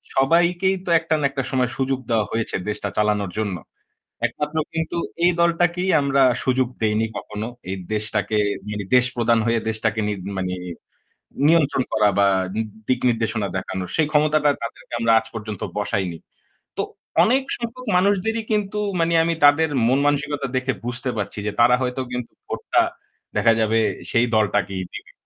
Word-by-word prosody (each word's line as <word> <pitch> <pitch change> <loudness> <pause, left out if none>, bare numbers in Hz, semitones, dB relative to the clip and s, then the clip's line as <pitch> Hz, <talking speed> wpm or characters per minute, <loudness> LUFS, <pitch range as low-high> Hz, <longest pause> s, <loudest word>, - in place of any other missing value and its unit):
সবাইকেই 175 +7 +3
তো - - -4
একটা 160 -1 -2
না 145 - 0
একটা 135 0 -3
সময় 130 -2 +1
সুযোগ 135 0 0
দেওয়া 110 -3 +2
হয়েছে 115 0 -2
দেশটা 105 -1 -3
চালানোর 105 -3 +1
জন্য। 100 -4 -1 0.7
একমাত্র 150 +2 -4 0.2
কিন্তু 160 +1 -2 0.3
এই 180 - +5
দলটাকেই 175 +2 +2
আমরা 140 -1 +2 0.2
সুযোগ 130 -1 +2
দেইনি 110 +1 +2
কখনো, 105 +1 -6 0.2
এই 95 - -2 0.2
দেশটাকে 110 0 -1 0.3
মানে 105 -1 -4
দেশ 125 0 +5
প্রধান 115 -1 +3
হয়ে 115 -1 +2
দেশটাকে 110 0 -1
নি - - 0 0.2
মানে 95 -1 -2 0.9
নিয়ন্ত্রণ 150 -5 +3
করা 105 -1 +4
বা 100 - +5 0.6
দিক 125 -1 +2
নির্দেশনা 115 -3 -1
দেখানো 95 0 -4
সেই 155 - +2
ক্ষমতাটা 150 -1 +3
তাদেরকে 115 - -8
আমরা 115 0 +2
আজ 110 - -11
পর্যন্ত 110 -3 -6 0.2
বসাইনি। 95 -4 -1 0.6
তো - - +1 0.4
অনেক 260 +4 +3
সংখ্যক 240 +2 -6
মানুষদেরই 205 +4 +1
কিন্তু 210 -1 0 0.2
মানে 165 0 +2
আমি 170 0 +1
তাদের 160 +3 +5 0.2
মন-মানসিকতা 145 +2 +1
দেখে 130 +1 0
বুঝতে 125 +1 -3
পারছি 105 0 -4
যে, - - 0
তারা 120 +1 +6
হয়তো 125 +1 -1
কিন্তু 125 -1 -4 0.2
ভোটটা - - +1 0.5
দেখা 115 - +4
যাবে 110 0 +2 0.3
সেই 115 +1 +3
দলটাকেই 100 -3 +1
দিবে। - - -9
125 Hz, 150 wpm, -22 LUFS, 110-160 Hz, 0.9 s, তারা